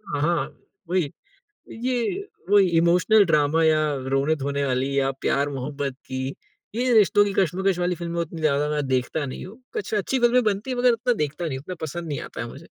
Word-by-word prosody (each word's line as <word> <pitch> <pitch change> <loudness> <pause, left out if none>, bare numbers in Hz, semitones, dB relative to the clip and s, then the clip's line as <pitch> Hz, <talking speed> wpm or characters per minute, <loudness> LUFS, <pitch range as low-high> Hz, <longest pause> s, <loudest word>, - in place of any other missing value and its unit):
अ, - - 0
हाँ, 165 -2 +1 0.4
वही 175 -6 0 0.6
ये 250 +3 -2 0.6
वही 205 -2 +6
इमोशनल 180 +5 +5
ड्रामा 155 0 +3
या 155 -1 +4 0.3
रोने-धोने 140 0 0
वाली 135 +1 0
या 135 0 +2
प्यार-मोहब्बत 140 0 -1
की, 130 +1 -4 0.4
ये 250 +1 +1
रिश्तों 205 -1 +5
की 200 - -2
कशमकश 190 +1 +1
वाली 180 0 0
फ़िल्में 170 0 -4
उतनी 165 0 -5
ज़्यादा 150 -1 +2
मैं 150 -2 -1
देखता 130 +3 0
नहीं 130 - -6
हूँ। 225 +7 -13
कुछ 435 - -4
अच्छी 215 +6 0
फ़िल्में 245 +1 +4
बनती 210 +4 -1
है 250 - -2
मगर 245 0 +4
उतना 245 +2 +1
देखता 150 -2 -3
नहीं 135 -5 -2
हूँ, - - -11
उतना 185 - -5
पसंद 170 +3 -6
नहीं 145 - -3
आता - - -7
है 115 - -3
मुझे। 115 - -10
165 Hz, 195 wpm, -24 LUFS, 140-205 Hz, 0.6 s, वही